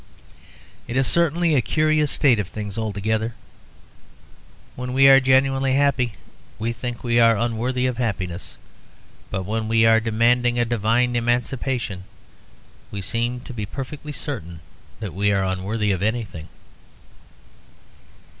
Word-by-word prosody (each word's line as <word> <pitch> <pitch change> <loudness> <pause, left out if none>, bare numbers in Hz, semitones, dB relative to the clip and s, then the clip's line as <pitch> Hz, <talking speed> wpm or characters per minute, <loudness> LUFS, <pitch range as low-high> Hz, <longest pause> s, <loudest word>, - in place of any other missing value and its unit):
It 120 +1 -3
is 135 - +3
certainly 170 +1 +2
a 135 - +4
curious 155 +1 +1
state 135 -7 +3
of 100 - -2
things 105 0 -6
altogether. 110 +1 -2 1.4
When 125 0 -5
we 135 +1 +6
are 135 0 +8
genuinely 135 0 +2
happy, 135 -4 +2 0.4
we 115 +2 -2
think 120 +1 -6
we 120 -1 +2
are 115 -1 +5
unworthy 120 +3 -1
of 125 -2 -1
happiness. 95 -7 -4 0.7
But 95 -1 -3
when 110 +2 -2
we 115 0 +3
are 115 0 +6
demanding 120 +2 +2
a 120 - +2
divine 120 +2 +1
emancipation 120 -4 -1 0.8
we 100 - -5
seem 120 +5 -2
to 130 - -9
be 105 -3 -4
perfectly 140 +5 -7
certain 90 - -4 0.4
that 105 -5 -5
we 100 +2 +1
are 95 -1 +1
unworthy 100 +3 -1
of 95 -2 -2
anything. 105 -7 -3
115 Hz, 135 wpm, -22 LUFS, 105-130 Hz, 1.4 s, are